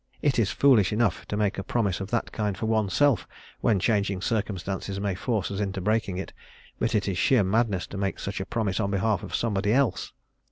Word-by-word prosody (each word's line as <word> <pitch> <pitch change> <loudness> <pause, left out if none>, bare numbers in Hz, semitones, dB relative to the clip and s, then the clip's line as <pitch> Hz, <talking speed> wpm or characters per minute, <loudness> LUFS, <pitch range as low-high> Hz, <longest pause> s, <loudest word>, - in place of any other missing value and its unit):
It 140 -5 +2
is 105 -4 +2
foolish 125 -9 +4
enough 105 -4 0
to 105 - -3
make 105 -2 0
a - - -3
promise 100 -3 0
of 95 - -5
that 120 0 -1
kind 105 -3 -2
for - - -3
oneself 110 +4 +2 0.3
when 110 -5 +2
changing 100 -2 0
circumstances 100 -3 -2
may 100 -1 -1
force 100 +1 -2
us 100 - -3
into 95 -2 -2
breaking 100 -1 0
it, 95 - -6 0.5
but 115 0 0
it 105 - +1
is 95 -2 -1
sheer 125 -6 +4
madness 100 -1 +1
to 95 - -7
make 100 -1 -1
such 100 - -4
a - - -3
promise 105 -4 -1
on 100 -2 0
behalf 100 -1 +1
of - - -5
somebody 105 -3 0
else. 130 -6 +1
105 Hz, 210 wpm, -26 LUFS, 95-115 Hz, 0.5 s, foolish